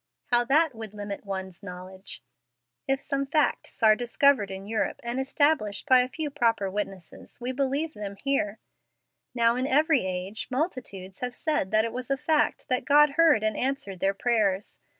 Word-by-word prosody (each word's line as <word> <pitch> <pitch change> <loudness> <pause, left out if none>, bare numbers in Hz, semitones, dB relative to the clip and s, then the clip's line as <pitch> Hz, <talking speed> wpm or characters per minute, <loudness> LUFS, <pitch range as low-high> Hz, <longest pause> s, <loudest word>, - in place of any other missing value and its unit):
How 240 0 +4
that 300 +3 +3
would 220 -2 -9
limit 205 0 -6
one's 190 -1 -5
knowledge. 185 0 -10 0.6
If 270 0 +1
some 275 0 -2
facts 300 -4 0
are 215 -1 +7
discovered 245 -1 +2
in 190 0 -7
Europe 220 +1 -2
and 235 +2 -3
established 270 -6 +1
by 260 -3 +6
a 250 - -2
few 305 +1 -4
proper 230 -8 +1
witnesses, 195 -2 -6
we 245 +1 -3
believe 280 +4 -1
them 200 -1 -6
here. 220 -3 -1 0.8
Now 235 -1 +3
in 255 +2 -1
every 295 -1 +3
age 185 +4 -5
multitudes 250 - -4
have 250 -1 -4
said 300 - -1
that 215 +2 +3
it 230 - -4
was 255 +1 -5
a 275 - +1
fact 300 +1 0
that 255 0 0
God 295 0 +5
heard 305 -7 +4
and 215 -1 0
answered 250 -8 -3
their 195 +2 +1
prayers. 210 -4 0
240 Hz, 170 wpm, -27 LUFS, 200-275 Hz, 0.8 s, are